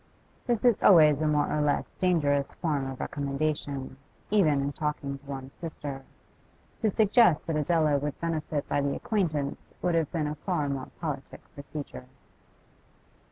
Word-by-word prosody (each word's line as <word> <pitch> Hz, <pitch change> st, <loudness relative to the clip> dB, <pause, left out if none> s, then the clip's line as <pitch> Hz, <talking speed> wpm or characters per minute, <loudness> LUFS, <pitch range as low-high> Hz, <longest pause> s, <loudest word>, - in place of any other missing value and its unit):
This 240 Hz, -1 st, +1 dB
is 240 Hz, -4 st, +4 dB
always 155 Hz, -6 st, +7 dB
a 155 Hz, -, +2 dB
more 150 Hz, -1 st, +2 dB
or 150 Hz, -, +1 dB
less 145 Hz, -1 st, 0 dB
dangerous 145 Hz, -6 st, +1 dB
form 145 Hz, -5 st, -1 dB
of 130 Hz, -, -7 dB
recommendation, 140 Hz, -1 st, -3 dB, 0.3 s
even 160 Hz, -9 st, +4 dB
in 140 Hz, +1 st, -1 dB
talking 145 Hz, -2 st, -3 dB
to 140 Hz, -, -24 dB
one's 135 Hz, -1 st, -6 dB
sister. 145 Hz, -5 st, -6 dB, 0.8 s
To 220 Hz, -, +2 dB
suggest 210 Hz, -4 st, +4 dB
that 165 Hz, -, -2 dB
Adela 155 Hz, -1 st, +2 dB
would 145 Hz, 0 st, -4 dB
benefit 155 Hz, -3 st, -2 dB
by 145 Hz, -, +1 dB
the 140 Hz, 0 st, 0 dB
acquaintance 160 Hz, -10 st, -2 dB
would 180 Hz, -, +2 dB
have 165 Hz, -3 st, +1 dB
been 160 Hz, -3 st, -1 dB
a 150 Hz, -, -2 dB
far 155 Hz, -1 st, -2 dB
more 135 Hz, -2 st, -4 dB
politic 145 Hz, -5 st, -5 dB
procedure. 140 Hz, -2 st, -8 dB
150 Hz, 155 wpm, -28 LUFS, 140-165 Hz, 0.8 s, always